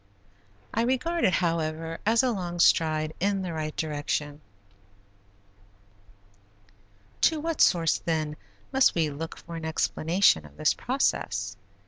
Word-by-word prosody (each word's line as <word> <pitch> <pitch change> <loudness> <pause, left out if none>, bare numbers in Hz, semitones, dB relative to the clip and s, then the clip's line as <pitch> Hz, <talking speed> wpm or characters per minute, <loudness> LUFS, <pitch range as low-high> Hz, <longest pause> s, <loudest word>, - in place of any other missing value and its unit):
I 225 - +1
regard 260 +8 0
it, 185 - +3
however 165 -1 -1
as 230 +3 +4
a 255 - +2
long 175 -5 -4
stride 155 -2 +3
in 195 +1 0
the 175 -2 -4
right 155 -1 -4
direction. 150 -1 -3 2.8
To 320 - +3
what 325 0 -2
source, 165 -4 +4
then, 155 -2 -2 0.4
must 265 0 +4
we 160 -3 +1
look 160 +3 -6
for 170 - -10
an 165 - -7
explanation 160 - +2
of 75 -1 -15
this - - +3
process? 100 +1 -1
165 Hz, 125 wpm, -27 LUFS, 155-195 Hz, 2.8 s, as